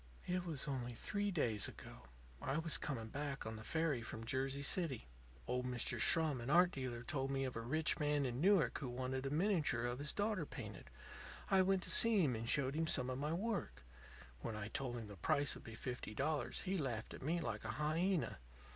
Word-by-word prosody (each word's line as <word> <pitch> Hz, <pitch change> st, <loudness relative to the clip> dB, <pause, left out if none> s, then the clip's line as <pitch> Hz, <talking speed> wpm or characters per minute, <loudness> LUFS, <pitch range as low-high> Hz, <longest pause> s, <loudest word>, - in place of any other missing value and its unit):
"It 180 Hz, 0 st, -1 dB
was 150 Hz, -3 st, -2 dB
only 125 Hz, -3 st, -3 dB
three 205 Hz, -, 0 dB
days 120 Hz, -, +2 dB
ago. -, -, -11 dB, 0.3 s
I 135 Hz, +2 st, -1 dB
was 165 Hz, -1 st, +3 dB
coming 115 Hz, -6 st, -4 dB
back 140 Hz, +1 st, -4 dB
on 110 Hz, 0 st, -4 dB
the 110 Hz, -, -8 dB
ferry 160 Hz, -3 st, 0 dB
from 115 Hz, 0 st, -6 dB
Jersey 135 Hz, +2 st, 0 dB
City. 145 Hz, -, 0 dB, 0.4 s
Old 125 Hz, 0 st, -1 dB
Mr. 120 Hz, -1 st, +1 dB
Schrum, 155 Hz, -2 st, +5 dB
an 120 Hz, -, -5 dB
art 175 Hz, +3 st, +6 dB
dealer, 125 Hz, -3 st, -4 dB
told 135 Hz, +1 st, -2 dB
me 135 Hz, 0 st, 0 dB
of 130 Hz, -, -4 dB
a 115 Hz, -, -3 dB
rich 155 Hz, +8 st, 0 dB
man 145 Hz, -1 st, +1 dB
in 125 Hz, +1 st, -2 dB
Newark 195 Hz, -2 st, +4 dB
who 135 Hz, -, -4 dB
wanted 130 Hz, +2 st, -3 dB
a -, -, -1 dB
miniature 155 Hz, -, +1 dB
of 120 Hz, +1 st, -2 dB
his 145 Hz, +1 st, +1 dB
daughter 205 Hz, -3 st, 0 dB
painted. -, -, -8 dB, 0.6 s
I 190 Hz, -1 st, +6 dB
went 190 Hz, 0 st, +2 dB
to -, -, +2 dB
see 225 Hz, -5 st, +6 dB
him 130 Hz, -6 st, +2 dB
and 115 Hz, +1 st, -3 dB
showed 135 Hz, -2 st, +2 dB
him 160 Hz, +1 st, 0 dB
some 130 Hz, -4 st, +2 dB
of 130 Hz, -, -3 dB
my 150 Hz, +2 st, -1 dB
work. 185 Hz, -, -2 dB, 0.6 s
When 110 Hz, -, -4 dB
I 105 Hz, 0 st, -4 dB
told 125 Hz, 0 st, -3 dB
him 115 Hz, -, -5 dB
the 100 Hz, -2 st, -10 dB
price 140 Hz, -, +2 dB
would -, -, -10 dB
be 115 Hz, -, -9 dB
fifty 125 Hz, -2 st, -5 dB
dollars 145 Hz, 0 st, 0 dB
he 190 Hz, -1 st, -1 dB
laughed 120 Hz, -7 st, -3 dB
at -, -, -9 dB
me 160 Hz, +6 st, 0 dB
like 165 Hz, -, -3 dB
a -, -, -4 dB
hyena. 165 Hz, +4 st, 0 dB
140 Hz, 215 wpm, -38 LUFS, 120-165 Hz, 0.6 s, art